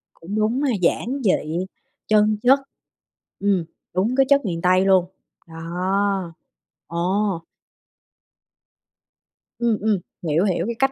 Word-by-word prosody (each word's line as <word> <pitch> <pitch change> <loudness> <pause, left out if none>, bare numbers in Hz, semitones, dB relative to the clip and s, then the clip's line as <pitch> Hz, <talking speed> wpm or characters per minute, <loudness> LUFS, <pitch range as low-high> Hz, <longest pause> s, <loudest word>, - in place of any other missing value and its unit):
Cũng 180 +5 -7
đúng 220 +5 +1
ha, 280 -4 +1
giản 255 +9 0
dị, 175 -3 0 0.4
chân 215 0 +3
chất. 265 +3 +6 0.8
Ừm, 195 -4 +1 0.3
đúng 200 +8 +1
cái 270 0 +4
chất 280 -2 +4
miền 170 -4 -2
Tây 185 +1 +3
luôn. 190 -2 +4 0.4
Đó. 180 +3 -2 0.5
Ồ! 185 +2 -1 2.2
Ừm, 235 -2 +2
ừm, 215 -1 +2 0.3
hiểu, 155 +4 +2
hiểu, 180 -3 0
cái 235 +2 -3
cách 270 0 +3
195 Hz, 120 wpm, -22 LUFS, 175-220 Hz, 2.2 s, chất